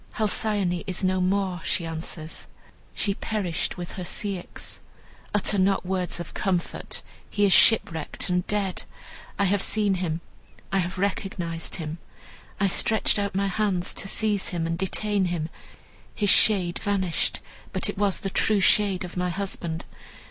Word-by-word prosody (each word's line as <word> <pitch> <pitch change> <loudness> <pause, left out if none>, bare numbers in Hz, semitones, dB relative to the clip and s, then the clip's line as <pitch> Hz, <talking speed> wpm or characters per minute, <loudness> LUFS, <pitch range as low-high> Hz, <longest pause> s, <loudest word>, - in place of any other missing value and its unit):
"Halcyone 205 -4 +1
is 190 0 -1
no 185 0 +2
more," 185 -1 0
she 170 - 0
answers, 160 0 -6 0.5
"she 200 - +1
perished 195 -5 -2
with 175 0 -6
her 185 - -3
Ceyx. 190 0 -4 0.5
Utter 205 0 +2
not 190 0 +2
words 180 -1 -1
of 175 - -7
comfort, 185 -3 -2 0.3
he 205 -1 +2
is 195 - +5
shipwrecked 165 -8 +3
and 180 -1 0
dead. 200 -3 0 0.6
I 200 - +3
have 195 +1 +2
seen 210 -1 +1
him, 175 -3 -2 0.5
I 195 - +4
have 180 +1 -2
recognized 185 -4 -2
him. 160 0 -5 0.6
I 200 - +3
stretched 210 +3 +4
out 200 -1 -2
my 200 +1 +2
hands 195 -3 0
to - - -4
seize 210 -1 +1
him 170 -3 -2
and 165 0 -1
detain 195 +2 0
him. 170 -3 -2 0.7
His 205 -2 +4
shade 185 -5 +4
vanished, 190 -4 0 0.3
but - - 0
it - - -4
was 200 -2 +2
the 195 - -3
true 210 +2 +3
shade 195 -1 +3
of 175 - -9
my 180 0 0
husband. 175 -3 -2
190 Hz, 155 wpm, -26 LUFS, 175-200 Hz, 0.7 s, is